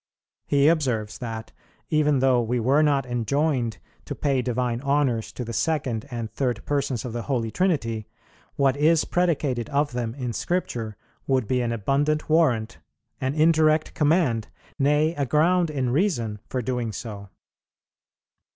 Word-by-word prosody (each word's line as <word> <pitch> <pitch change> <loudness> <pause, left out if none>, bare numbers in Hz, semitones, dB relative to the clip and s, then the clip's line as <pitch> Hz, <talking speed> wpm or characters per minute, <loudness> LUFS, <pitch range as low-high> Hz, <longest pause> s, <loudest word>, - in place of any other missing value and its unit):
He 140 0 +4
observes 125 -10 0
that, 115 -2 -6 0.4
even 150 -3 +3
though 130 -2 +4
we 120 +2 -1
were 135 +6 +3
not 140 -3 +2
enjoined 120 - 0 0.3
to - - -5
pay 135 -3 +1
divine 125 -1 -1
honours 140 -6 0
to 125 - -5
the 115 - -6
Second 130 -4 -1
and 115 -4 -5
Third 120 -2 -2
Persons 140 -5 -1
of 120 - -5
the 120 - -3
Holy 115 -4 -2
Trinity, 115 - 0 0.5
what 135 -1 +2
is 155 +2 +3
predicated 145 -9 0
of 145 +1 +1
Them 120 -1 -3
in 125 -4 -4
Scripture 115 - -2 0.3
would 130 -5 +1
be 125 +2 +1
an 120 -1 -1
abundant 140 +7 0
warrant, 125 -9 +2 0.4
an 130 +2 -1
indirect 155 0 +3
command, 145 -8 +2 0.3
nay, 150 +3 +3
a 145 -4 -1
ground 170 +6 +3
in 135 -5 -1
reason, 120 - 0
for 130 -2 -2
doing 125 -2 -2
so. 100 -3 -7
130 Hz, 150 wpm, -24 LUFS, 115-150 Hz, 0.5 s, He